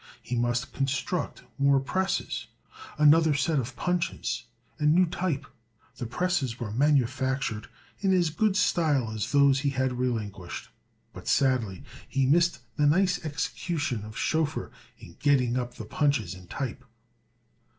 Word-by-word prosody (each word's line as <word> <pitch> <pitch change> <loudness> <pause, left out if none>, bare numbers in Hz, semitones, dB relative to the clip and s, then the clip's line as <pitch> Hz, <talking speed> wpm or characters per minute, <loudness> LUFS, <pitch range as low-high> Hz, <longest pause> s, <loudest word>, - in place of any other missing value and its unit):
He 125 - -3
must 120 0 0
construct 135 +4 -2 0.2
more 140 0 +5
presses, 190 +8 -1 0.5
another 155 0 +5
set 145 +2 +1
of 125 0 -4
punches, 170 -9 -1 0.3
and 150 +1 +4
new 185 +1 +6
type. 165 -4 -2 0.5
The 120 - -4
presses 145 -5 -1
were 115 -3 -4
manufactured 130 -3 +1 0.3
in 195 -1 +2
as 175 -4 +3
good 205 +4 +1
style 145 - +2
as 110 -1 -3
those 140 -1 +5
he 140 +1 +1
had 130 -2 -1
relinquished; 105 -7 -3 0.4
but - - -10
sadly 125 -8 +1 0.3
he 135 -1 +1
missed 170 +5 +3 0.2
the 150 -1 +4
nice 180 +5 +2
execution 155 - -2
of 110 0 -9
Schoeffer 160 -2 0 0.3
in 85 - -14
getting 130 -4 +3
up 125 -1 -3
the 110 - -7
punches 125 - 0
and 90 -1 -13
type. 130 -1 -4
135 Hz, 140 wpm, -27 LUFS, 120-160 Hz, 0.5 s, new